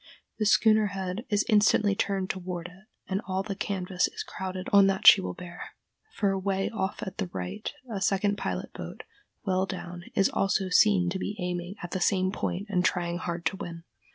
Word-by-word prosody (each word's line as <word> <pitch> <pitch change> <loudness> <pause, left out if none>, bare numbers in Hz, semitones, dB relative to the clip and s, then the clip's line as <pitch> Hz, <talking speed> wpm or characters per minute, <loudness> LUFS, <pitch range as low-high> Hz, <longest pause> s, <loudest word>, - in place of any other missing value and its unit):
The 215 - +2
schooner's 215 -1 +4
head 190 +4 -4
is 205 -1 +2
instantly 210 -1 +4
turned 195 -1 -1
toward 180 -2 -5
it, 185 +3 -18 0.2
and 190 +1 -1
all 190 0 -1
the 200 0 -4
canvas 190 -2 -1
is 435 0 -6
crowded 185 - -5
on 200 -1 +8
that 195 -1 -1
she - - +10
will 90 0 -4
bear, 175 -1 -9 0.4
for 200 -2 +2
away 195 0 -1
off 195 -3 -3
at 190 - -7
the 195 - -1
right 95 - -5 0.2
a 210 -5 -4
second 200 +1 +2
pilot - - -4
boat, - - -8 0.4
well 190 -1 +1
down, 175 -2 -7
is 195 - +4
also 195 -1 0
seen 180 -2 +4
to 190 - -3
be 205 - -3
aiming 180 +1 -3
at 175 - -6
the 185 - -2
same 185 0 +2
point 195 -1 -3
and 185 -3 +1
trying 175 -1 0
hard 170 -1 -4
to 195 - 0
win. 170 -4 -7
190 Hz, 195 wpm, -28 LUFS, 180-200 Hz, 0.4 s, she